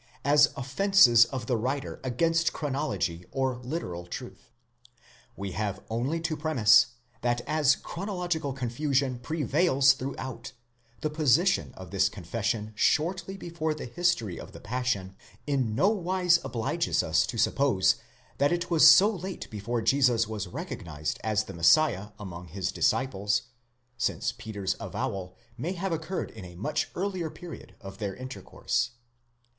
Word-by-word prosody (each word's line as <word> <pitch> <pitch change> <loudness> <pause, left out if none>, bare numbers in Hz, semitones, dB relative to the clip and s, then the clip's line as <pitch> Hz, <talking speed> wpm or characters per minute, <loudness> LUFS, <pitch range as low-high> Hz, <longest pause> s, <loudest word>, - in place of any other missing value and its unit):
as 145 +1 +5
offences 135 - +5
of 120 -1 -5
the 125 - 0
writer 130 +5 -2
against 165 +6 +1
chronology 135 - -2
or 130 -2 -1
literal 120 - -5
truth. 125 +5 -8 0.9
We 100 -1 -5
have 100 0 -2
only 130 +9 -1
to 165 -1 -1
premise, 145 -10 +5 0.3
that 120 0 0
as 150 -2 +3
chronological 175 -5 -3
confusion 130 0 -1
prevails 140 0 +3
throughout, 130 -2 -6 0.5
the 155 - -1
position 160 +5 +2
of 95 -1 -10
this 95 -1 +3
confession 105 +3 -3
shortly 180 - +1
before 165 -4 -3
the - - -6
history 120 - 0
of - - -10
the - - -10
Passion, 105 -5 -2 0.3
in 130 -7 0
nowise 185 - +3
obliges 115 -2 0
us 80 0 +2
to 115 0 -5
suppose 120 -5 +3 0.4
that 140 +3 +3
it 175 0 -1
was 160 -2 +7
so 185 +5 +9
late 190 -3 -5
before 110 +2 -3
Jesus 125 -4 +3
was 105 -3 -4
recognised 75 -3 -5
as 110 -1 +1
the 95 - -9
Messiah 95 - +4
among 90 -3 -8
his 90 +2 -3
disciples, 105 -2 +1 0.6
since 120 0 0
Peter's 105 -6 -4
avowal 90 -2 -4 0.2
may 170 +9 -2
have 190 +1 -3
occurred 165 +3 -3
in 110 - -10
a 90 -1 -10
much 150 - -2
earlier 185 -3 -2
period 175 +2 -10
of 95 +1 -10
their 100 -3 -3
intercourse. 130 -1 -3
130 Hz, 140 wpm, -28 LUFS, 105-155 Hz, 0.9 s, so